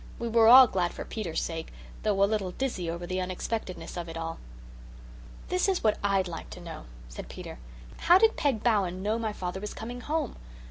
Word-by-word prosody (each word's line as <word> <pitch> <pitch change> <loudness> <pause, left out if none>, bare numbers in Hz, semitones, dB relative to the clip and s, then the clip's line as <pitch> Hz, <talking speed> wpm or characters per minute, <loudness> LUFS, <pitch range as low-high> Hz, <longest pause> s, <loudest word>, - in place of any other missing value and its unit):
We 235 - -3
were 225 -1 +5
all 255 +3 +11
glad 180 -6 -1
for - - -6
Peter's 190 -8 -3
sake, 165 -1 -5 0.3
though 200 -2 +2
a - - +8
little 200 -3 -1
dizzy 195 -10 -2
over 170 +1 -4
the 185 +1 -2
unexpectedness 185 +2 -4
of 170 -1 -4
it 165 - -6
all. 165 0 -4 1.1
"This 365 +2 +1
is 380 - 0
what 215 -1 +2
I'D 195 -2 +2
like 165 -2 -7
to - - -9
know," 170 -2 -8 0.2
said - - -9
Peter. - - -8 0.4
"How 350 - +6
did 445 +3 +4
Peg 265 -8 0
Bowen 190 -6 +1
know 215 +3 0
my 220 -2 -1
father 185 -2 -4
was 210 +1 -6
coming 245 +2 -6
home? 300 -3 -2
200 Hz, 200 wpm, -28 LUFS, 180-235 Hz, 1.1 s, all